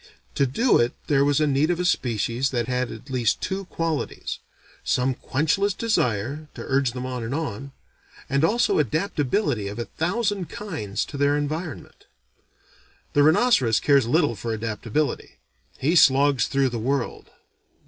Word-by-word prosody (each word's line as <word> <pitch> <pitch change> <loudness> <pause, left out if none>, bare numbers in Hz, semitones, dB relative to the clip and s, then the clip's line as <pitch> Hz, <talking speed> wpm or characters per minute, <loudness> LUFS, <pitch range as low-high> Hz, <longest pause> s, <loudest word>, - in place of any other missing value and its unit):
To 140 - +2
do 235 - +3
it 120 +1 +1
there 140 -2 +3
was 145 0 +2
need 150 0 +2
of 175 -1 0
a 180 - 0
species 120 - 0
that 120 -3 -2
had 125 -1 -1
at 135 +2 -10
least 120 -4 +1
these - - -3
two 195 +1 -4
qualities: 165 -3 -3 0.4
some 130 +1 +1
quenchless 160 +11 0
desire, 140 - -1
to - - -7
urge 135 -3 +1
them 125 0 -5
on 125 -2 -4
and 115 +5 -3
on; 140 -4 -4 0.6
and 140 +2 +1
also 230 +5 +2
adaptability 145 - 0
of 100 - -6
a 120 - -3
thousand 195 +1 -2
kinds 150 - -4
to 145 - -8
their 145 +1 +2
environment. 155 +1 -5 1.1
The 145 - +4
rhinoceros 150 - +4
cares 140 -5 +3
little 145 0 +2
for 115 +3 -4
adaptability. 115 +6 -3 0.4
He 155 +6 +1
slogs 140 -5 +5
through 135 -1 +1
the 120 -1 -4
world. 130 +2 -2
140 Hz, 155 wpm, -24 LUFS, 125-160 Hz, 1.1 s, slogs